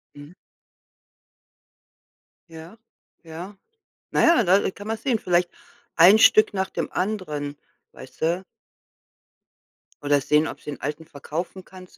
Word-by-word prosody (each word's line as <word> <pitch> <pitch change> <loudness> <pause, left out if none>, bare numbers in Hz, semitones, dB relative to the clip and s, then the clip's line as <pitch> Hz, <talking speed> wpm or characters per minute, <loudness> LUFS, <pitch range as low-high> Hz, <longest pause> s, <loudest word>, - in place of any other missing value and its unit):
Mhm. 145 +4 -13 2.2
Ja. 165 +5 -12 0.5
Ja. 170 +5 -9 0.6
Na - - +1
ja, 335 -8 +5
da, 185 0 +4
äh, 190 - -2
kann 205 +2 -11
man 225 0 -2
sehen, 235 -1 -1
vielleicht 175 -2 +1 0.5
ein 185 +6 +7
Stück 215 -1 +5
nach 190 -1 -2
dem - - -4
anderen, 155 -8 -3 0.4
weißt - - -14
du? 170 +4 0 1.6
Oder 145 -1 +2
sehen, 150 +3 +2
ob - - -8
sie - - -9
’n 145 - -7
alten 150 +3 -5
verkaufen 165 +5 -7
kannst 185 -1 -15
175 Hz, 130 wpm, -23 LUFS, 155-195 Hz, 2.2 s, ein